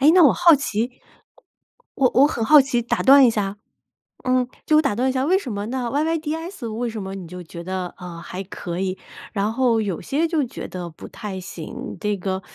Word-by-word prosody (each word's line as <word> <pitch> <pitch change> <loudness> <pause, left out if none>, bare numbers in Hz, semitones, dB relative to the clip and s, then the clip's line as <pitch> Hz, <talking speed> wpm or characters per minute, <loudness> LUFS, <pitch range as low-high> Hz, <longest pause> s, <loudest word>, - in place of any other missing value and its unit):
诶， 285 +3 +7
那 365 - +7
我 285 - +7
好 345 -2 +6
奇， 240 -3 -1 1.0
我 260 -2 +3
我 275 +3 +7
很 235 -7 -2
好 300 +4 +8
奇 260 -3 +1
打 235 - -1
断 275 +1 +8
一 - - +4
下 205 -2 -2 0.7
嗯， 255 -1 +2 0.2
就 305 - +4
我 - - +6
打 275 -9 0
断 255 +3 +1
一 260 - -1
下， 260 0 0
为 370 +4 +4
什 270 - -5
么 205 +1 -4
那 245 -1 -2
YYDS 320 - -2
为 240 +1 -2
什 220 -2 -5
么 190 0 -6
你 185 -3 -8
就 180 +1 -8
觉 170 +1 -9
得， 185 -1 -4
呃， 175 -2 -8
还 180 +2 -6
可 180 -2 -6
以， 190 0 -2 0.4
然 210 +1 0
后 240 -2 +2
有 195 -5 -3
些 295 - 0
就 320 -3 +1
觉 245 - -6
得 180 -2 -6
不 160 - -11
太 205 -4 -6
行， 185 +8 -7
这 210 -1 -1
个， 190 +1 -3
235 Hz, 250 characters per minute, -22 LUFS, 190-275 Hz, 1.0 s, 好